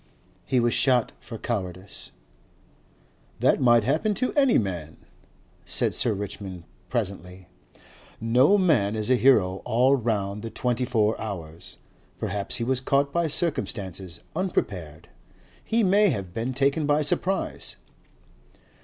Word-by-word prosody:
He 130 Hz, -, +2 dB
was 120 Hz, 0 st, +2 dB
shot 125 Hz, -3 st, +3 dB
for 115 Hz, -, -8 dB
cowardice." 95 Hz, -4 st, -5 dB, 1.3 s
"That -, -, +3 dB
might 120 Hz, -3 st, +5 dB
happen 200 Hz, -, +1 dB
to 255 Hz, +3 st, -1 dB
any 275 Hz, -4 st, +4 dB
man," 85 Hz, -7 st, -3 dB, 0.7 s
said -, -, 0 dB
Sir 120 Hz, -, +1 dB
Richmond 95 Hz, -3 st, -6 dB, 0.3 s
presently. 95 Hz, -5 st, -4 dB, 0.7 s
"No 125 Hz, -, +4 dB
man 130 Hz, -, +2 dB
is 110 Hz, +3 st, -2 dB
a -, -, +6 dB
hero 105 Hz, -8 st, +3 dB
all 125 Hz, +4 st, +3 dB
round 105 Hz, -5 st, -2 dB
the 115 Hz, -, -5 dB
twenty 125 Hz, +1 st, -1 dB
four 110 Hz, -3 st, +1 dB
hours. 85 Hz, -7 st, -7 dB, 0.4 s
Perhaps 100 Hz, 0 st, -3 dB
he 115 Hz, -, -2 dB
was 130 Hz, +1 st, +1 dB
caught 140 Hz, +1 st, +1 dB
by 170 Hz, -1 st, +1 dB
circumstances, 95 Hz, -, -2 dB
unprepared. 95 Hz, -, -3 dB, 0.6 s
He 230 Hz, 0 st, +1 dB
may 200 Hz, +2 st, +4 dB
have 100 Hz, -, -3 dB
been 120 Hz, +4 st, -3 dB
taken 140 Hz, +3 st, +1 dB
by 150 Hz, +1 st, +3 dB
surprise." 190 Hz, +6 st, -1 dB
115 Hz, 125 wpm, -25 LUFS, 100-140 Hz, 1.3 s, a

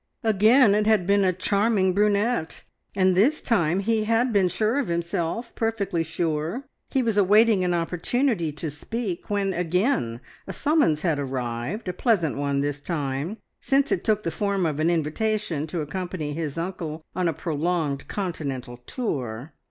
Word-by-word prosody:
Again 220 Hz, +2 st, +5 dB
it 210 Hz, +1 st, +2 dB
had 215 Hz, -5 st, +3 dB
been 200 Hz, +1 st, +3 dB
a 185 Hz, -, +3 dB
charming 200 Hz, +1 st, +1 dB
brunette, 205 Hz, -1 st, +1 dB, 0.3 s
and 185 Hz, -1 st, +3 dB
this 255 Hz, +12 st, +4 dB
time 180 Hz, -5 st, +1 dB
he 220 Hz, +1 st, +1 dB
had 230 Hz, +2 st, +2 dB
been 195 Hz, -3 st, +4 dB
sure 220 Hz, +8 st, 0 dB
of 280 Hz, -, -1 dB
himself, 170 Hz, +6 st, -2 dB
perfectly 205 Hz, -6 st, -1 dB
sure. 165 Hz, -, -2 dB, 0.3 s
He 265 Hz, -2 st, +1 dB
was 225 Hz, -3 st, 0 dB
awaiting 210 Hz, 0 st, +5 dB
an 175 Hz, -1 st, +1 dB
opportunity 175 Hz, -, 0 dB
to 150 Hz, +1 st, -4 dB
speak 190 Hz, +5 st, -5 dB
when 200 Hz, -2 st, 0 dB
again 175 Hz, -, 0 dB, 0.3 s
a -, -, -5 dB
summons 290 Hz, -, +2 dB
had 160 Hz, -5 st, +1 dB
arrived, 130 Hz, -, -3 dB
a 180 Hz, -, -1 dB
pleasant 180 Hz, -, +1 dB
one 140 Hz, 0 st, 0 dB
this 145 Hz, 0 st, -2 dB
time, 145 Hz, +4 st, -3 dB, 0.2 s
since 275 Hz, 0 st, +2 dB
it -, -, 0 dB
took 215 Hz, -1 st, +1 dB
the 165 Hz, -, -1 dB
form 200 Hz, +2 st, 0 dB
of 155 Hz, -2 st, -1 dB
an 160 Hz, +2 st, +2 dB
invitation 170 Hz, 0 st, -1 dB
to 160 Hz, +1 st, -3 dB
accompany 160 Hz, -1 st, -4 dB
his 155 Hz, -1 st, -4 dB
uncle 165 Hz, -3 st, -4 dB
on 180 Hz, -1 st, +1 dB
a -, -, +2 dB
prolonged 155 Hz, -3 st, -2 dB
continental 140 Hz, -10 st, -4 dB
tour. 125 Hz, -, -4 dB
180 Hz, 160 wpm, -25 LUFS, 155-215 Hz, 0.3 s, Again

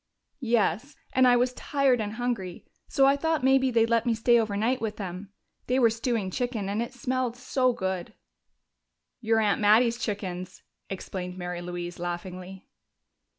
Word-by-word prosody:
"Yes. 235 Hz, -, 0 dB, 0.2 s
And 260 Hz, -1 st, +5 dB
I 245 Hz, -, +6 dB
was 250 Hz, +1 st, +2 dB
tired 270 Hz, -2 st, +1 dB
and 210 Hz, 0 st, -3 dB
hungry, 220 Hz, -7 st, -3 dB, 0.2 s
so 270 Hz, -, +3 dB
I 275 Hz, +1 st, +5 dB
thought 320 Hz, -1 st, 0 dB
maybe 265 Hz, 0 st, +4 dB
they'd 230 Hz, -2 st, +3 dB
let 230 Hz, 0 st, +1 dB
me 230 Hz, -, +2 dB
stay 235 Hz, +1 st, +4 dB
overnight 220 Hz, +3 st, 0 dB
with 215 Hz, -2 st, -3 dB
them. 190 Hz, 0 st, -6 dB, 0.4 s
They 250 Hz, -, +1 dB
were 235 Hz, -3 st, +5 dB
stewing 225 Hz, -4 st, -2 dB
chicken, 240 Hz, -4 st, -2 dB
and 205 Hz, +3 st, -1 dB
it 235 Hz, -, -4 dB
smelled 255 Hz, -1 st, -2 dB
so 255 Hz, 0 st, +1 dB
good." 190 Hz, -5 st, -4 dB, 1.0 s
"Your 225 Hz, -1 st, +2 dB
aunt 210 Hz, 0 st, +1 dB
Mattie's 230 Hz, +3 st, +4 dB
chickens," 185 Hz, -4 st, -5 dB, 0.3 s
explained 185 Hz, -1 st, -6 dB
Mary 175 Hz, -1 st, -4 dB
Louise 175 Hz, 0 st, -6 dB
laughingly. 180 Hz, +2 st, -6 dB
225 Hz, 155 wpm, -27 LUFS, 190-250 Hz, 1.0 s, I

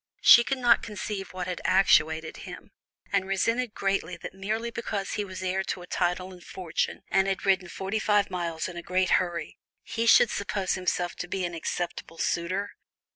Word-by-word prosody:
She 235 Hz, -, +9 dB
could 270 Hz, +2 st, -1 dB
not 245 Hz, -2 st, +4 dB
conceive 205 Hz, -2 st, -5 dB
what 185 Hz, -1 st, -4 dB
had 180 Hz, -1 st, -4 dB
actuated 160 Hz, -4 st, +3 dB
him, -, -, -10 dB, 0.4 s
and 190 Hz, -, +2 dB
resented 230 Hz, +5 st, 0 dB
greatly 195 Hz, -3 st, -1 dB
that -, -, -8 dB
merely 215 Hz, +5 st, -3 dB
because 210 Hz, -4 st, -3 dB
he 210 Hz, -, -1 dB
was 185 Hz, -1 st, -7 dB
heir 185 Hz, +1 st, 0 dB
to 180 Hz, -, -4 dB
a -, -, -9 dB
title 180 Hz, +1 st, -1 dB
and 180 Hz, -1 st, -14 dB
fortune, 180 Hz, -4 st, -3 dB
and 195 Hz, 0 st, +3 dB
had 195 Hz, 0 st, -2 dB
ridden 190 Hz, -2 st, +2 dB
forty 195 Hz, +5 st, -3 dB
five 210 Hz, -2 st, +2 dB
miles 170 Hz, -3 st, -2 dB
in 180 Hz, -2 st, -8 dB
a -, -, -4 dB
great 185 Hz, +2 st, 0 dB
hurry, 175 Hz, -2 st, -5 dB, 0.2 s
he 230 Hz, +1 st, -2 dB
should 230 Hz, -, +7 dB
suppose 200 Hz, -1 st, -1 dB
himself 180 Hz, -1 st, -1 dB
to 180 Hz, -, -4 dB
be 185 Hz, 0 st, -2 dB
an 175 Hz, -, -4 dB
acceptable 165 Hz, 0 st, -4 dB
suitor. 185 Hz, +5 st, -1 dB
190 Hz, 185 wpm, -27 LUFS, 180-200 Hz, 0.4 s, She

